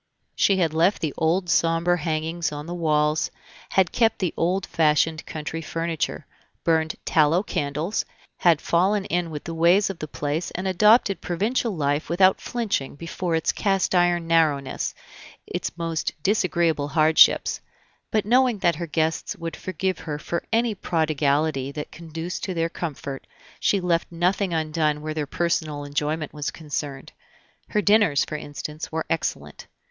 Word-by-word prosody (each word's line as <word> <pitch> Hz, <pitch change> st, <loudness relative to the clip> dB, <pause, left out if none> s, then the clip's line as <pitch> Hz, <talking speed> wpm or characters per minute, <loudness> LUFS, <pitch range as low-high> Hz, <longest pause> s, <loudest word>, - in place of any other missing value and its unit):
She 195 Hz, -, +3 dB
had 165 Hz, -4 st, +1 dB
left 170 Hz, +5 st, +3 dB
the 155 Hz, -, -1 dB
old 175 Hz, +3 st, +1 dB
somber 170 Hz, +1 st, +2 dB
hangings 160 Hz, 0 st, -2 dB
on 145 Hz, 0 st, -6 dB
the 170 Hz, -, -5 dB
walls, 155 Hz, -2 st, +1 dB, 0.4 s
had 190 Hz, -3 st, +2 dB
kept 225 Hz, -2 st, +2 dB
the 180 Hz, -4 st, -1 dB
old 185 Hz, +3 st, 0 dB
fashioned 160 Hz, 0 st, +2 dB
country 160 Hz, +1 st, -5 dB
furniture, 165 Hz, 0 st, -3 dB, 0.4 s
burned 160 Hz, -1 st, +1 dB
tallow 160 Hz, +4 st, +3 dB
candles, 150 Hz, +3 st, -2 dB, 0.3 s
had 170 Hz, -4 st, +3 dB
fallen 190 Hz, +4 st, +2 dB
in 175 Hz, 0 st, -1 dB
with 150 Hz, -2 st, -6 dB
the 165 Hz, -, -5 dB
ways 175 Hz, +5 st, +4 dB
of 180 Hz, -, -11 dB
the 155 Hz, -, -5 dB
place 150 Hz, +3 st, -3 dB
and 185 Hz, +2 st, -2 dB
adopted 210 Hz, +2 st, +4 dB
provincial 220 Hz, +7 st, 0 dB
life 145 Hz, -1 st, -1 dB
without 185 Hz, +2 st, +4 dB
flinching 210 Hz, -, -2 dB
before 170 Hz, +2 st, -3 dB
its 160 Hz, -, +1 dB
cast 195 Hz, -2 st, 0 dB
iron 175 Hz, -1 st, +3 dB
narrowness, 155 Hz, -5 st, +1 dB, 0.5 s
its -, -, -4 dB
most 165 Hz, -1 st, -2 dB
disagreeable 170 Hz, -7 st, +1 dB
hardships; 155 Hz, +2 st, +4 dB, 0.5 s
but 215 Hz, -2 st, 0 dB
knowing 245 Hz, 0 st, +3 dB
that 170 Hz, -5 st, +1 dB
her 170 Hz, -, -4 dB
guests 160 Hz, +4 st, -1 dB
would 170 Hz, -4 st, -5 dB
forgive 185 Hz, -1 st, -3 dB
her 150 Hz, -2 st, -4 dB
for 170 Hz, +3 st, -3 dB
any 230 Hz, 0 st, +2 dB
prodigality 155 Hz, -5 st, 0 dB
that 150 Hz, +1 st, -6 dB
conduced 165 Hz, +1 st, -6 dB
to 185 Hz, -, -4 dB
their 165 Hz, 0 st, 0 dB
comfort, 140 Hz, -5 st, -6 dB, 0.3 s
she 200 Hz, -, +2 dB
left 175 Hz, -2 st, 0 dB
nothing 180 Hz, +3 st, 0 dB
undone 155 Hz, -2 st, 0 dB
where 155 Hz, 0 st, -3 dB
their 150 Hz, -2 st, -3 dB
personal 155 Hz, -3 st, -1 dB
enjoyment 150 Hz, +2 st, -2 dB
was 150 Hz, -1 st, -3 dB
concerned; 145 Hz, -3 st, -5 dB, 0.6 s
her 210 Hz, -, 0 dB
dinners, 205 Hz, -9 st, +4 dB
for -, -, -5 dB
instance, 150 Hz, +1 st, -6 dB
were 160 Hz, 0 st, -2 dB
excellent. 75 Hz, -, -3 dB
165 Hz, 150 wpm, -24 LUFS, 155-180 Hz, 0.6 s, ways